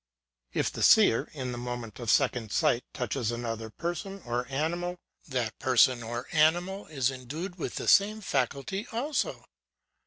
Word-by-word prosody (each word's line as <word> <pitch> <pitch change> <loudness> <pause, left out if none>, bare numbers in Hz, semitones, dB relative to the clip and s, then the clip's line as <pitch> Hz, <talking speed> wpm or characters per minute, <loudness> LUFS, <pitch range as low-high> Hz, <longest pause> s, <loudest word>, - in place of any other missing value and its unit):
If - - 0
the - - -6
seer, 155 - +5
in 130 -4 -4
the 120 - -5
moment 120 -3 -6
of 120 -2 -4
second 125 -5 +2
sight, 145 -7 +2
touches 120 -2 -2
another 115 -2 -4
person, 175 - -4
or 120 +1 -2
animal, 170 +6 -2 0.3
that 125 -6 -2
person, 125 -1 +4
or 120 +2 -4
animal, 175 +5 +2
is 135 -4 0
endued 155 +9 -6
with - - -4
the - - -4
same 210 +2 +5
faculty 195 - -2
also. 270 +6 -2
135 Hz, 150 wpm, -29 LUFS, 120-175 Hz, 0.3 s, seer